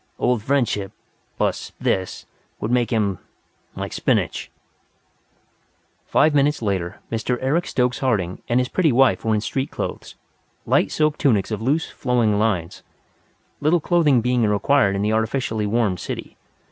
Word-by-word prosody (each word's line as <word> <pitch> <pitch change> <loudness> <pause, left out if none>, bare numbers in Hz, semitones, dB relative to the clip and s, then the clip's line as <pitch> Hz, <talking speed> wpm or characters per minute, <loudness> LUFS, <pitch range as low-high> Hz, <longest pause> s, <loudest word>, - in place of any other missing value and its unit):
"Old 125 -3 +1
friendship, 115 -6 0 0.4
plus - - -2
this, 95 -1 -1 0.3
would 110 - -3
make 120 -3 +2
him 100 -5 0 0.6
like - - -5
spinach." - - 0 1.6
Five 150 +1 +3
minutes 145 +1 +2
later 95 -2 -2
Mr. 115 +2 -1
Eric 150 +7 0
Stokes 125 -1 0
Harding 100 -9 -1
and 120 +1 +3
his 125 - 0
pretty 165 +1 +2
wife 130 +1 +3
were 110 -1 +1
in 105 - 0
street 130 +5 -2
clothes, - - -6 0.5
light - - +2
silk 155 -1 +1
tunics 110 -9 +2
of 110 -1 -3
loose, 145 +8 0
flowing 115 -5 +1
lines 95 -7 -1 0.8
little 155 +4 +3
clothing 155 -6 +3
being 125 +1 +1
required 105 +1 +2
in 100 - -1
the 105 +1 +1
artificially 110 -1 -1
warmed 105 -4 0
city. - - -6
120 Hz, 145 wpm, -22 LUFS, 105-135 Hz, 1.6 s, Five